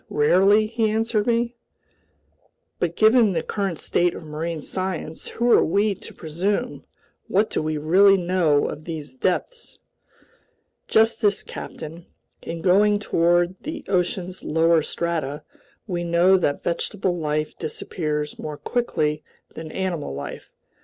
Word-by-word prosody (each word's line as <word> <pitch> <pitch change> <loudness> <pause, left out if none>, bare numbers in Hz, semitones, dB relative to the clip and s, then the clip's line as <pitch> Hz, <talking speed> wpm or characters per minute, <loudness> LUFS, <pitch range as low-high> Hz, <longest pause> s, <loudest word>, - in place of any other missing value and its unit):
Rarely!" 195 +8 +4
he 225 0 0
answered 220 0 0
me. 235 0 +1 1.3
"But 170 -1 -1
given 220 -2 +5
the - - -1
current 195 -5 -2
state 175 +3 0
of - - -8
marine 155 +1 -4
science, 185 -4 -4
who 240 +1 0
are - - +6
we 200 +5 +2
to - - -11
presume, 190 +9 -2 0.4
what 210 +3 +1
do - - 0
we 155 0 -2
really 190 +6 +5
know 175 -5 +2
of 155 - -7
these 155 -5 -6
depths?" 185 - -2 1.1
"Just 225 +1 +3
this, 205 -2 +2
captain. 165 +3 -8 0.3
In 165 0 -6
going 205 +3 +4
toward 175 -2 +2
the 310 - -6
ocean's 180 0 -1
lower 165 +1 +3
strata, 155 -3 -3 0.4
we 175 -4 -3
know 170 +2 +4
that 145 -6 0
vegetable 180 +2 -1
life 155 -1 -2
disappears 150 -2 -3
more 150 -1 -5
quickly 150 -5 -1 0.3
than 160 -1 -8
animal 175 - -3
life. 70 - -7
175 Hz, 130 wpm, -23 LUFS, 155-205 Hz, 1.3 s, are